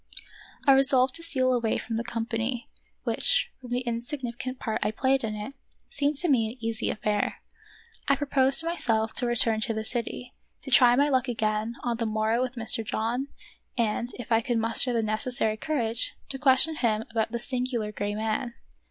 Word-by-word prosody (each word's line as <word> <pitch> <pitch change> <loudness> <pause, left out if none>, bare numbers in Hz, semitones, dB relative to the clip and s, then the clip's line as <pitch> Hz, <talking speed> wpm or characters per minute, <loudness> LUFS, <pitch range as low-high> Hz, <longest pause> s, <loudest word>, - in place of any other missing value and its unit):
I, 275 - +6
resolved 265 -1 +5
to - - -10
steal 260 -6 +2
away 235 -3 0
from 225 - -5
the 230 - -1
company, 230 +1 -3 0.4
which, 480 - +2
from 250 - -10
the 245 +1 -1
insignificant 245 +1 -4
part 220 -3 -3
I - - +1
played 265 +4 +1
in 215 -1 -3
it, 210 +6 -6 0.4
seemed 290 -9 0
to 350 +6 +1
me 245 -7 +3
an 240 - -10
easy 225 -1 -2
affair. 210 -1 -1 0.7
I 275 - +4
proposed 275 0 +3
to - - -8
my 340 +1 -2
self 220 -4 +2
to 245 - +1
return 225 -2 +2
to 225 0 -1
the 220 0 -3
city, 245 +1 -3 0.3
to 270 - -7
try 245 -1 +7
my 285 +3 +3
luck 260 -1 +1
again 220 -1 -1
on 240 -2 -1
the 230 -1 -1
morrow 220 +2 0
with 255 0 -3
Mr. 225 -1 -1
John, 230 +5 -2 0.5
and, 235 +1 0
if 245 -1 -9
I 225 0 +4
could 240 0 -1
muster 230 +3 +4
the 230 -2 0
necessary 215 +1 0
courage, 230 -3 -1
to 270 - -6
question 290 +3 +4
him 220 -4 0
about 225 -1 -1
the 235 - -2
singular 245 -3 -2
gray 205 0 -3
man. 220 +2 -2
240 Hz, 190 wpm, -27 LUFS, 220-260 Hz, 0.7 s, try